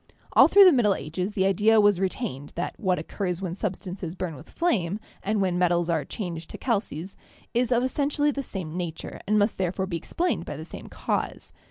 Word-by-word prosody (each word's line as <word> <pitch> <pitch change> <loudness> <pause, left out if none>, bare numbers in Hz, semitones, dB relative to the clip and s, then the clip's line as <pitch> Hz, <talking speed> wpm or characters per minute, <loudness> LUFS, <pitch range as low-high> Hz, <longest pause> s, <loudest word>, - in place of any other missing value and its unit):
All - - +8
through 405 - +8
the 365 - +9
Middle 225 - +3
Ages 180 +7 -4
the 190 -3 +1
idea 210 +3 +4
was 205 -3 +4
re 190 -1 +2
tained 145 - -6
that 175 - -2
what 185 -4 +1
occurs 180 +2 -3
when 185 -3 -3
substances 185 -3 -4
burn 180 -3 -3
with 130 - -13
flame, 210 - 0 0.2
and 210 0 0
when 180 -2 +1
metals 175 -1 +2
are 160 -3 0
changed 170 -6 -5
to - - -7
calces, 195 - -2 0.4
is 245 +1 +1
of 240 0 +3
essentially 290 +2 +1
the 280 - -3
same 180 - -6
nature 170 -3 -5
and 215 +1 +3
must 205 0 +1
therefore 190 +1 0
be 180 -3 -3
explained 345 - -1
by - - -6
the - - -7
same - - -9
cause. - - -3
190 Hz, 205 wpm, -26 LUFS, 175-220 Hz, 0.4 s, the